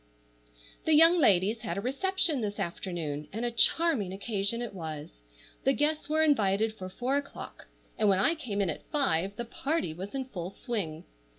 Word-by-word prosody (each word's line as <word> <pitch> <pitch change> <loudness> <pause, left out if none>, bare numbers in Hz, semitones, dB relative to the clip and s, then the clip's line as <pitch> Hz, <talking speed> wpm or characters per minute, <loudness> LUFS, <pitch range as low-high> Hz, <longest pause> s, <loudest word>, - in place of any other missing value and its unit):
THE 315 - +4
young 330 +3 +7
ladies 205 - +3
had 215 -2 -4
a - - 0
reception 310 - 0
this 205 -1 -3
afternoon, 165 -4 -4
and 225 +4 -3
a 240 - -1
charming 235 - +3
occasion 200 +2 -2
it 240 -3 -5
was. 155 - -7 0.4
The 270 - +4
guests 300 +2 0
were 315 +1 +3
invited 220 -7 +2
for 185 -4 -7
four 250 +8 -1
o'clock, 285 0 -7 0.3
and 215 -1 +4
when 195 - +4
I 200 - +3
came 225 -11 -3
in 190 -4 +1
at - - -10
five 195 - +1
the 240 - -4
party 275 - -2
was 190 +8 -7
in 265 -1 -2
full 185 -6 -6
swing. 180 - -3
215 Hz, 180 wpm, -29 LUFS, 190-280 Hz, 0.4 s, young